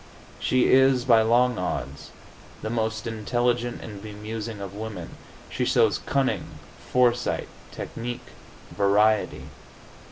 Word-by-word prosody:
She 130 -1 +2
is, 130 -1 +5
by 115 -3 +6
long 120 +1 +3
odds, 90 - -4 0.5
the 110 - -3
most 110 -1 -1
intelligent 120 +2 -1
and 105 -3 -8
bemusing 110 +1 -6
of 100 -1 -6
women. 110 +1 -6 0.4
She - - -2
shows - - +3
cunning, 135 -1 -1 0.3
foresight, 125 -1 +2 0.2
technique, 120 +1 -6 0.5
variety. 105 +1 +2
115 Hz, 105 wpm, -25 LUFS, 105-120 Hz, 0.5 s, by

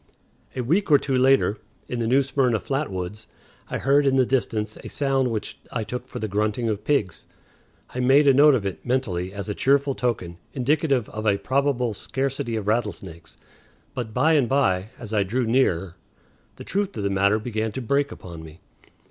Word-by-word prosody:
A 130 - -1
week 170 - +1
or 145 - +7
two 135 -1 -2
later, 130 -5 +3 0.3
in 125 - -4
the 115 - 0
New 135 +4 +4
Smyrna 130 -4 +1
flat 140 +5 -2
woods, 95 +4 -5 0.4
I - - -2
heard 140 +1 +3
in 135 - +3
the 130 -1 +4
distance 110 -4 -1
a - - -9
sound 135 -2 +1
which 110 -3 -5
I 115 - -2
took 125 +4 -6
for - - -8
the 110 - -3
grunting 105 +3 -1
of 105 -1 -3
pigs. 135 - -1 0.6
I 125 - -5
made 135 +4 +5
a 135 - +7
note 145 +1 +6
of 110 -6 -2
it, 95 - -4
mentally, 95 -8 -1
as 100 +1 -6
a 105 - -2
cheerful 140 +4 +2
token, 95 -10 -3 0.2
indicative 140 -2 +1
of 110 +1 -4
a 100 -1 +3
probable 130 -2 0
scarcity 130 +1 -3
of 110 -3 -3
rattlesnakes; 95 -8 -3 0.6
but 120 -3 -4
by 150 +8 +3
and 140 -6 +3
by, 105 -8 +1
as 110 -3 -8
I 105 - +3
drew 115 +6 0
nearer, 95 -8 +1 0.6
the - - -10
truth 200 0 -2
of 105 - -3
the 100 - 0
matter 100 +2 +3
began 110 0 -3
to - - -4
break 140 +4 0
upon 85 -3 -9
me. 80 0 -12
120 Hz, 195 wpm, -24 LUFS, 105-135 Hz, 0.6 s, or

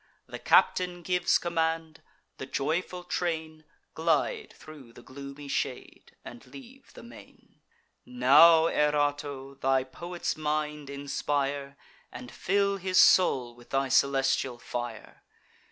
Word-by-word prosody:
The - - -9
captain 180 -1 +2
gives 180 +1 +2
command; 160 -2 -2 0.4
the 130 - -6
joyful 175 +6 -3
train 160 -3 -4 0.3
Glide 160 -2 -1
thro' 145 -6 -13
the - - -16
gloomy 140 +2 -10
shade, - - -5
and - - -11
leave 265 0 -14
the - - -13
main. 235 - -17 0.4
Now, 170 -10 +6
Erato, 145 -3 -1
thy 135 0 +2
poet's 175 +7 -5
mind 150 -1 -3
inspire, 140 0 -3 0.3
And 125 0 -10
fill 200 +1 0
his 185 -1 -2
soul 130 -10 +4
with 120 0 -18
thy 135 0 -1
celestial 135 -1 +1
fire! 120 -2 -7
150 Hz, 115 wpm, -28 LUFS, 135-170 Hz, 0.4 s, Now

